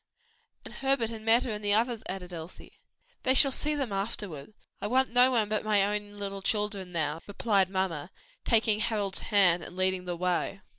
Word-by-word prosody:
"And -, -, -9 dB
Herbert 270 Hz, -4 st, 0 dB
and 220 Hz, -1 st, -8 dB
Meta 230 Hz, +2 st, +3 dB
and 210 Hz, 0 st, -5 dB
the 205 Hz, 0 st, +3 dB
others," 230 Hz, 0 st, 0 dB
added 180 Hz, -2 st, -6 dB
Elsie. 165 Hz, +1 st, -10 dB, 0.4 s
"They 260 Hz, 0 st, +2 dB
shall 275 Hz, 0 st, +6 dB
see 300 Hz, +3 st, -1 dB
them 270 Hz, -6 st, -2 dB
afterwards. 195 Hz, -6 st, -5 dB, 0.3 s
I -, -, -2 dB
want 260 Hz, +2 st, +1 dB
no 250 Hz, +1 st, +6 dB
one 230 Hz, -5 st, +1 dB
but 215 Hz, 0 st, -1 dB
my 210 Hz, -2 st, +3 dB
own 205 Hz, 0 st, -2 dB
little 200 Hz, -1 st, -5 dB
children 205 Hz, -2 st, -1 dB
now," 160 Hz, -2 st, -1 dB
replied 200 Hz, -2 st, +1 dB
mamma, 185 Hz, -5 st, -2 dB, 0.3 s
taking 220 Hz, -2 st, +3 dB
Harold's 210 Hz, -4 st, -1 dB
hand, 185 Hz, -5 st, +3 dB
and 180 Hz, -, -10 dB
leading 185 Hz, 0 st, 0 dB
the 175 Hz, -1 st, -3 dB
way. 180 Hz, +2 st, -1 dB
205 Hz, 185 wpm, -28 LUFS, 185-225 Hz, 0.4 s, shall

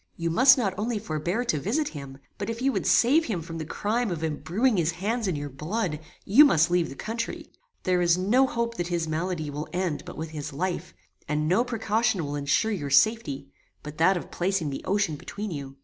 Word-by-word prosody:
You 170 Hz, 0 st, -1 dB
must 260 Hz, +10 st, +7 dB
not 205 Hz, -7 st, 0 dB
only 225 Hz, +1 st, -1 dB
forbear 175 Hz, +4 st, -2 dB
to 155 Hz, -10 st, 0 dB
visit 265 Hz, -, 0 dB
him, 140 Hz, -3 st, -9 dB, 0.2 s
but 200 Hz, +2 st, -3 dB
if 230 Hz, 0 st, -4 dB
you 270 Hz, +2 st, +2 dB
would -, -, -2 dB
save 295 Hz, +7 st, +4 dB
him 185 Hz, -8 st, -3 dB
from 165 Hz, 0 st, -7 dB
the 155 Hz, -, -4 dB
crime 225 Hz, +6 st, -1 dB
of 165 Hz, -3 st, -4 dB
embruing 190 Hz, -, 0 dB
his 170 Hz, -1 st, +1 dB
hands 215 Hz, +5 st, -2 dB
in 180 Hz, -, 0 dB
your 145 Hz, 0 st, -4 dB
blood, 155 Hz, -, -2 dB, 0.3 s
you 235 Hz, +10 st, +8 dB
must 165 Hz, -, +4 dB
leave 175 Hz, -2 st, +2 dB
the 135 Hz, -, -8 dB
country. 230 Hz, +8 st, -5 dB, 0.3 s
There 180 Hz, -1 st, +2 dB
is 170 Hz, 0 st, +4 dB
no 235 Hz, +9 st, +3 dB
hope 235 Hz, -1 st, -2 dB
that 175 Hz, -, -2 dB
his 170 Hz, -2 st, -1 dB
malady 160 Hz, -1 st, -2 dB
will 150 Hz, +2 st, -5 dB
end 180 Hz, -4 st, -1 dB
but -, -, -10 dB
with 160 Hz, +1 st, -5 dB
his 150 Hz, -3 st, -6 dB
life, 175 Hz, +2 st, -3 dB, 0.3 s
and 150 Hz, +1 st, 0 dB
no 185 Hz, +8 st, +3 dB
precaution 220 Hz, -5 st, 0 dB
will 145 Hz, 0 st, -4 dB
ensure 145 Hz, +10 st, +1 dB
your 150 Hz, -9 st, -3 dB
safety, 145 Hz, -8 st, +2 dB, 0.3 s
but 150 Hz, +1 st, -9 dB
that 185 Hz, +3 st, +4 dB
of -, -, -8 dB
placing 180 Hz, -4 st, -1 dB
the 135 Hz, -, -5 dB
ocean 195 Hz, -6 st, 0 dB
between 205 Hz, +6 st, -6 dB
you. 140 Hz, -3 st, -6 dB
180 Hz, 215 wpm, -26 LUFS, 155-220 Hz, 0.3 s, you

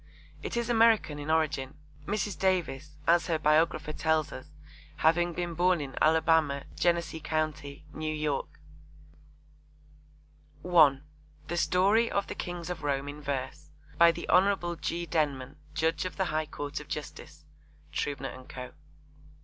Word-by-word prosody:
It -, -, -4 dB
is 235 Hz, -, 0 dB
American 225 Hz, -10 st, +3 dB
in 145 Hz, +1 st, -6 dB
origin, 155 Hz, -4 st, 0 dB, 0.3 s
Mrs. 205 Hz, -1 st, -1 dB
Davis, 155 Hz, -6 st, 0 dB
as 170 Hz, +1 st, +4 dB
her 165 Hz, -2 st, +1 dB
biographer 155 Hz, 0 st, +2 dB
tells 160 Hz, -1 st, +1 dB
us, 130 Hz, -, -9 dB, 0.5 s
having 175 Hz, +2 st, +3 dB
been 175 Hz, 0 st, -3 dB
born 175 Hz, +1 st, +3 dB
in 135 Hz, -2 st, -6 dB
Alabama, 160 Hz, -3 st, +3 dB
Genesee 170 Hz, -2 st, 0 dB
co., 155 Hz, 0 st, 0 dB
N.Y. 150 Hz, +1 st, -3 dB, 2.2 s
(1) 155 Hz, -6 st, +5 dB, 0.5 s
The 175 Hz, -, -2 dB
Story 200 Hz, +7 st, +3 dB
of 200 Hz, -, 0 dB
the -, -, -5 dB
Kings 175 Hz, 0 st, -5 dB
of 170 Hz, -3 st, -5 dB
Rome 140 Hz, -1 st, -1 dB
in 150 Hz, +1 st, -8 dB
Verse. 135 Hz, -2 st, -4 dB, 0.3 s
By 170 Hz, 0 st, +8 dB
the -, -, -7 dB
Hon. 180 Hz, -2 st, +3 dB
G. 170 Hz, +3 st, -2 dB
Denman, 145 Hz, -5 st, -1 dB, 0.2 s
Judge 160 Hz, 0 st, 0 dB
of 185 Hz, -, -5 dB
the 190 Hz, -, +1 dB
High 155 Hz, 0 st, 0 dB
Court 145 Hz, -1 st, -5 dB
of -, -, -11 dB
Justice. -, -, -7 dB, 0.5 s
(Trubner 140 Hz, -2 st, -2 dB
and 130 Hz, 0 st, -13 dB
Co.) 125 Hz, -1 st, -7 dB
160 Hz, 140 wpm, -29 LUFS, 145-175 Hz, 2.2 s, By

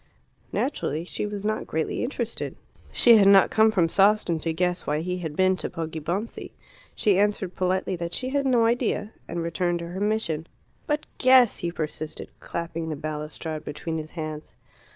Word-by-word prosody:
Naturally 160 Hz, -, -1 dB
she 185 Hz, -, -3 dB
was 205 Hz, -1 st, -5 dB
not 215 Hz, 0 st, -1 dB
greatly 160 Hz, 0 st, -1 dB
interested. 240 Hz, -2 st, -3 dB, 0.4 s
She 235 Hz, -2 st, +7 dB
had 200 Hz, -2 st, +6 dB
not 195 Hz, -1 st, +7 dB
come 220 Hz, 0 st, +5 dB
from 180 Hz, -6 st, +3 dB
Sawston 195 Hz, -2 st, +3 dB
to 165 Hz, +1 st, -1 dB
guess 180 Hz, +2 st, -1 dB
why 150 Hz, +1 st, 0 dB
he 180 Hz, +2 st, -3 dB
had 160 Hz, -4 st, -5 dB
been 185 Hz, +1 st, +3 dB
to -, -, -4 dB
Poggibonsi. 165 Hz, +5 st, -4 dB, 0.4 s
She 200 Hz, -3 st, +3 dB
answered 205 Hz, -3 st, +1 dB
politely 185 Hz, 0 st, 0 dB
that 170 Hz, 0 st, -3 dB
she 255 Hz, -, -3 dB
had 280 Hz, 0 st, 0 dB
no 240 Hz, -3 st, +4 dB
idea, 230 Hz, -2 st, 0 dB
and 170 Hz, 0 st, -3 dB
returned 175 Hz, +1 st, 0 dB
to 170 Hz, 0 st, -6 dB
her 180 Hz, +2 st, -5 dB
mission. 200 Hz, -7 st, -1 dB, 0.4 s
"But 300 Hz, -1 st, 0 dB
guess!" 255 Hz, -3 st, +6 dB
he 170 Hz, -, -3 dB
persisted, 155 Hz, -1 st, -5 dB
clapping 165 Hz, -1 st, -4 dB
the 155 Hz, -, -2 dB
balustrade 155 Hz, +1 st, -5 dB
between 160 Hz, +2 st, -4 dB
his 155 Hz, 0 st, -7 dB
hands. 155 Hz, -1 st, -6 dB
180 Hz, 175 wpm, -25 LUFS, 160-210 Hz, 0.4 s, She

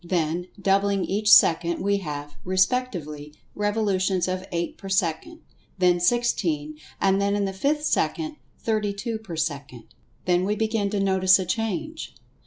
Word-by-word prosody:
Then, 175 Hz, 0 st, -1 dB
doubling 195 Hz, 0 st, +1 dB
each 210 Hz, +2 st, +1 dB
second, 170 Hz, +1 st, +5 dB
we 200 Hz, 0 st, +2 dB
have, 145 Hz, -5 st, -6 dB
respectively, 185 Hz, -, -1 dB, 0.2 s
revolutions 200 Hz, -3 st, 0 dB
of 185 Hz, +1 st, -3 dB
eight 170 Hz, 0 st, -2 dB
per 195 Hz, -, -9 dB
second, 195 Hz, -, -1 dB, 0.4 s
then 180 Hz, -1 st, +3 dB
sixteen, 170 Hz, -8 st, 0 dB, 0.2 s
and 195 Hz, 0 st, +2 dB
then 200 Hz, 0 st, +1 dB
in 205 Hz, -1 st, 0 dB
the 195 Hz, -, -3 dB
fifth 290 Hz, +10 st, 0 dB
second 310 Hz, 0 st, -1 dB, 0.2 s
thirty 215 Hz, -2 st, -1 dB
two 220 Hz, +2 st, -4 dB
per 200 Hz, -7 st, -8 dB
second. 145 Hz, -6 st, -4 dB, 0.3 s
Then 180 Hz, 0 st, +2 dB
we 205 Hz, +2 st, 0 dB
begin 220 Hz, -1 st, 0 dB
to 205 Hz, 0 st, -2 dB
notice 190 Hz, -1 st, +4 dB
a 190 Hz, -, -3 dB
change. 225 Hz, -, -3 dB
190 Hz, 150 wpm, -24 LUFS, 170-210 Hz, 0.4 s, second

